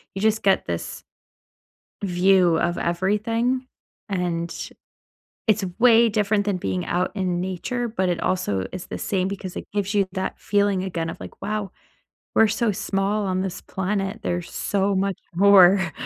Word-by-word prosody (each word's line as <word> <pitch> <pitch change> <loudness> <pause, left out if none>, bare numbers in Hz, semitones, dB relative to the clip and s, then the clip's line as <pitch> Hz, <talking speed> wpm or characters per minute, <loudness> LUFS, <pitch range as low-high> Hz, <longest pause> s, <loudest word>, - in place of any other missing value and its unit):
you 195 - -3
just 220 0 +2
get 195 -1 +3
this 85 -1 -5 1.0
view 180 -2 +4
of 175 +1 0
everything, 225 +8 0 0.4
and 170 -3 -2 0.8
it's 210 -2 +3
way 235 -1 +6
different 210 -1 +1
than 205 -2 0
being 95 - -2
out 180 +1 0
in 180 -3 -1
nature, 190 +7 -3
but 190 -4 -1
it 175 -2 -1
also 100 - 0
is 185 -1 -7
the - - -5
same 190 -2 -1
because 195 -2 -6
it - - -6
gives 205 0 -1
you 200 -2 +2
that 190 -1 -3
feeling 200 -2 +1
again 165 -3 -3
of - - -7
like, - - -11
"Wow. 210 0 -3 0.6
We're 225 - +6
so 220 +1 +1
small 200 +1 -1
on 185 -1 0
this 190 -2 -4
planet. 195 +2 -2
There's 175 -3 -3
so 200 0 0
much 195 -1 0 0.2
more 190 -2 +6
195 Hz, 155 wpm, -23 LUFS, 180-210 Hz, 1.0 s, way